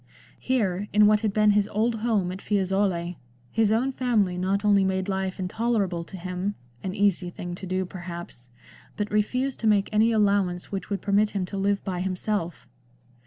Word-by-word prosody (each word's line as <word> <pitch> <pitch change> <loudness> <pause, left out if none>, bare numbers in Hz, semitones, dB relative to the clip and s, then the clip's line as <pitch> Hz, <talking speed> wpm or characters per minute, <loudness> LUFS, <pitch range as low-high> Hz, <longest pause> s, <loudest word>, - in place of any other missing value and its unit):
Here, 205 -6 0
in 210 0 +6
what 210 0 +5
had 215 -1 0
been 210 +1 +4
his 205 0 +2
old 225 +3 0
home 210 -6 +1
at 190 +1 -7
Fiesole, 190 -3 0 0.3
his 220 -2 +2
own 245 +5 +2
family 225 -8 +1
not 195 +3 0
only 200 -1 +5
made 190 0 0
life 190 -1 -2
intolerable 190 -2 -1
to 190 - -9
him 185 +3 -3
— 120 0 -31
an 190 0 -3
easy 200 -3 +1
thing 175 0 -6
to 185 +2 -7
do 185 +1 -1
perhaps 175 -9 -8 0.2
— - - -24
but 210 -1 -2
refused 250 +6 0
to 225 - 0
make 205 -2 +3
any 220 +2 +4
allowance 200 -5 +1
which 195 -1 -4
would 200 -1 -3
permit 205 +1 +3
him 185 - 0
to 190 - -7
live 200 0 +1
by 185 -2 -3
himself. 185 - -2
200 Hz, 190 wpm, -26 LUFS, 185-210 Hz, 0.3 s, in